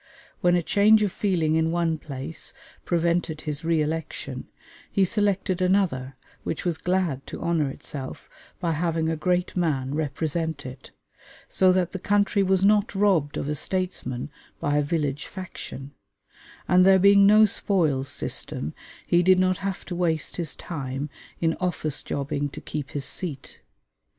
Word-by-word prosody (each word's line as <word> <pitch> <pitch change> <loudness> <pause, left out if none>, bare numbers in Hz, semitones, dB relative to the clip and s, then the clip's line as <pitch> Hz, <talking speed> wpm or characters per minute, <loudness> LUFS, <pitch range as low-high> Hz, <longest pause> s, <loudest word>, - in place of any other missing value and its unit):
When 175 0 +3
a 175 - +1
change 215 +4 +5
of 205 - 0
feeling 170 -7 0
in 160 0 +2
one 165 -2 0
place 140 +2 -5 0.3
prevented 170 -2 0
his 150 0 -4
re 165 -2 +2
election, 150 -4 -4 0.4
he 195 -2 +3
selected 195 -2 0
another 180 -9 +1 0.3
which - - -4
was 170 -3 0
glad 180 -7 -1
to - - -7
honor 160 -4 0
itself 135 0 -7 0.3
by 170 -3 0
having 165 0 0
a 165 - 0
great 180 +3 0
man 140 -7 0
represent 155 0 -2
it, 130 0 -9 0.6
so 185 -1 +4
that 180 -2 +1
the 190 - -5
country 205 +1 +2
was 190 0 +3
not 210 +3 +3
robbed 190 -8 +2
of - - -3
a 150 - 0
statesman 150 -7 -2 0.3
by 145 0 0
a - - +4
village 145 -2 -2
faction; 175 -7 -8 0.8
and 180 0 +5
there 190 0 +7
being 200 +1 +6
no 215 +1 +7
spoils 160 -10 +1
system, 75 - 0 0.3
he 175 - +3
did 185 +1 +5
not 185 0 +2
have 195 0 -4
to 175 - -5
waste 165 -3 -1
his 170 -4 -2
time 140 -2 -5 0.3
in 165 -1 +2
office 155 -5 -1
jobbing 145 0 -2
to - - -9
keep 145 -2 -5
his 140 -2 -3
seat. 150 -7 -4
165 Hz, 155 wpm, -25 LUFS, 145-185 Hz, 0.8 s, there